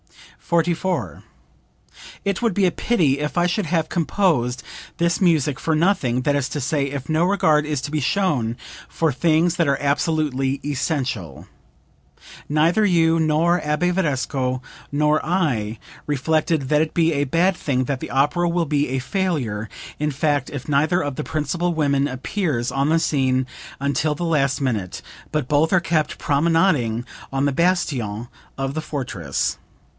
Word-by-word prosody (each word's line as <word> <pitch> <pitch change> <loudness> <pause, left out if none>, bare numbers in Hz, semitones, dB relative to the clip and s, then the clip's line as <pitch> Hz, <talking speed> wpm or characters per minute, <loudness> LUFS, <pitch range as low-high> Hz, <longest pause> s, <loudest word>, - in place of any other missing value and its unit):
44. 170 - -1 1.0
"It 200 +1 -1
would 230 -4 +1
be 200 - +3
a 180 - +3
pity 160 - +1
if 150 0 -3
I 175 - +4
should 180 +1 -1
have 165 -1 0
composed 155 - 0 0.3
this 170 +1 +1
music 155 -6 +2
for 160 - 0
nothing, 155 -8 +1
that 145 +1 +2
is 140 -1 0
to 150 - -3
say 140 +1 0
if 140 -1 -5
no 155 +1 +2
regard 160 -5 +3
is 150 -2 -1
to 145 - -5
be 155 -1 0
shown 130 - 0 0.3
for 160 -3 0
things 165 +4 +2
that 170 -3 +1
are 140 -1 +1
absolutely 140 -2 0
essential. 130 - -3 1.0
Neither 160 +8 +3
you, 165 -4 +3
nor 160 +2 +2
Abbe 150 +4 0
Varesco, 135 -7 -1 0.3
nor 150 +1 +2
I, 135 - 0 0.3
reflected 150 0 0
that 150 +2 +3
it 160 - 0
will - - -30
be 165 -1 +3
a 140 -1 +1
bad 175 +7 +2
thing, 130 -6 -1
that 135 0 -2
the - - -5
opera 170 +6 +2
will 170 0 +1
be 145 -2 0
a 130 +1 -1
failure, 130 - -2 0.3
in 150 0 0
fact, 145 -1 0
if 135 -2 -7
neither 155 +5 +2
of 145 -4 -3
the 150 - -3
principal 165 +4 -1
women 140 -3 +1
appears 130 - -2
on 140 +2 0
the 165 +1 +3
scene 130 -4 +1 0.3
until 140 +2 0
the 175 - -3
last 140 -4 +1
minute, 110 -10 -2 0.3
but 150 -5 -1
both 150 +3 +2
are 185 - +5
kept 165 -2 0
promenading 145 -6 +1 0.3
on 135 +1 0
the 140 - +1
bastion 130 - 0 0.3
of 135 0 -2
the 155 - -2
fortress. 110 - -3
150 Hz, 160 wpm, -22 LUFS, 135-165 Hz, 1.0 s, are